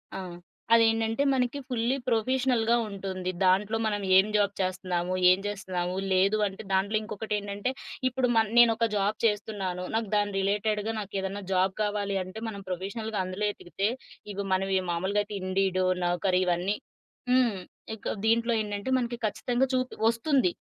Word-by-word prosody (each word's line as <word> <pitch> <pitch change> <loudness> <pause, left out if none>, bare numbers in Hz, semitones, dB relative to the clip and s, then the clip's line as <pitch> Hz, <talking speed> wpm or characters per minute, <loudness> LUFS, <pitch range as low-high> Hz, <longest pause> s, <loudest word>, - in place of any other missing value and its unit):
ఆ! - - -3 0.5
అదేంటంటే 225 +2 +3
మనకి 255 +1 0
ఫుల్లీ 245 +1 0
ప్రొఫెషనల్‌గా 240 0 +2
ఉంటుంది. 190 -2 -4
దాంట్లో 200 +4 +3
మనం 205 -1 0
ఏం 190 +1 +7
జాబ్ 205 -1 +2
చేస్తన్నాము? 185 -1 -1 0.2
ఏం 185 +1 +5
చేస్తున్నాము? 185 -3 -3 0.2
లేదు 195 +3 +3
అంటే 195 +2 -8
దాంట్లో 195 +3 +2
ఇంకొకటేంటంటే 205 +1 -3 0.4
ఇప్పుడు 255 0 +1
మన్ 220 -1 +3
నేనొక 230 -1 +6
జాబ్ 205 +1 +1
చేస్తున్నాను. 205 -4 -1
నాకు 225 -2 -1
దాని 205 -1 +1
రిలేటెడ్‌గా 210 +2 0
నాకు 205 -1 -7
ఏదన్నా 195 +1 -4
జాబ్ 185 +1 +2
కావాలి 205 -1 -1
అంటే 185 +4 -9
మనం 200 -3 -6
ప్రొఫెషనల్‌గా 200 +4 -3
అందులో 185 +3 -3
ఎతికితే 195 +2 -3 0.5
ఇవి 200 0 -3
మనవి 190 0 +1
మామూలుగా 190 +5 0
అయితే 205 0 -8
ఇండీడో, 185 0 +1 0.2
నౌకరీ 180 +1 +1
ఇవన్నీ 180 +4 0 0.5
హ్మ్. 250 -4 +4 0.4
ఇక 220 - -4
దీంట్లో 230 +1 +3
ఏంటంటే 205 +2 -4
మనకి 240 -1 -2
ఖచ్చితంగా 245 +4 0
చూపి 255 0 -1
ఒస్తుంది. 235 - +2
205 Hz, 140 wpm, -28 LUFS, 190-225 Hz, 0.5 s, ఏం